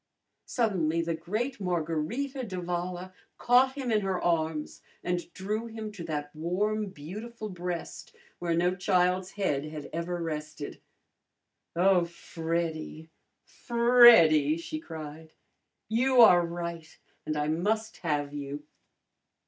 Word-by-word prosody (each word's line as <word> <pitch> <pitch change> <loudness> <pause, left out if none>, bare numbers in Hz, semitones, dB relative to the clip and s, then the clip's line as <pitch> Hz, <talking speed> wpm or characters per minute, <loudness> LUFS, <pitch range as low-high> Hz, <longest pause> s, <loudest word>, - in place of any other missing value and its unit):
Suddenly 170 -9 +1
the 165 0 -1
great 210 +11 -3
Margarita 180 - -2
d'Avala 180 -2 -4 0.2
caught 255 +2 +4
him 260 -4 -3
in 215 -1 +3
her 190 -2 -1
arms 160 -3 -1 0.2
and 175 -1 -2
drew 215 +4 -3
him 220 -1 -6
to 200 -5 -8
that 150 -2 -4
warm, 205 +7 -1
beautiful 215 +7 -7
breast 180 -2 -6 0.2
where 170 -1 0
no 175 +2 +2
child's 180 0 +1
head 165 -9 0
had 155 -1 -8
ever 170 +2 -3
rested. 150 -2 -5 0.9
"Oh, 180 0 +4
Freddy, 165 -1 -4 0.3
Freddy!" 235 - +6
she 310 - -5
cried. 160 - -9 0.5
"You 250 +4 +2
are 180 -6 +8
right, 170 -1 -6 0.3
and 155 - -2
I 150 0 0
must 215 +7 -1
have 145 -4 -2
you!" 145 0 -5
175 Hz, 115 wpm, -29 LUFS, 160-215 Hz, 0.9 s, are